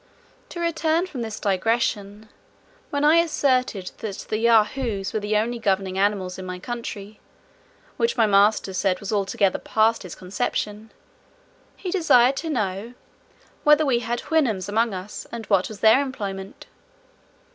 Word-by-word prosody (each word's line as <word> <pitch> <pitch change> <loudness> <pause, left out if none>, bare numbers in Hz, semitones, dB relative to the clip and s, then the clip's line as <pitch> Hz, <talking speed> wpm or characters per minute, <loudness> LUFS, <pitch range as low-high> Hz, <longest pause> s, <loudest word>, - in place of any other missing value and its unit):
To 345 - -7
return 330 0 +1
from 285 -9 -7
this 220 -2 -5
digression. 210 +1 -1 0.6
When 285 0 -1
I 310 +2 +6
asserted 255 - +1
that 205 -3 -6
the 215 - -1
Yahoos 225 -2 +2
were 215 - 0
the 210 +1 0
only 235 +3 -1
governing 195 -3 0
animals 195 -2 0
in 185 - -7
my 180 0 -5
country, 215 -1 -7 0.8
which 465 0 0
my 225 - +5
master 200 -1 +3
said 185 0 0
was 200 0 -5
altogether 200 -1 +1
past 225 +1 +1
his 185 -4 -8
conception, 210 +3 -3 0.9
he 365 - -5
desired 270 -8 +4
to 325 - -3
know, 210 -3 -3 0.7
"whether 300 +1 +5
we 250 -4 +2
had 240 0 -3
Houyhnhnms 240 - 0
among 220 0 0
us, 185 +3 -7
and 230 -2 -6
what 195 -3 +2
was 215 -2 -10
their 225 +5 +6
employment?" 200 -8 -6
220 Hz, 145 wpm, -23 LUFS, 195-255 Hz, 0.9 s, I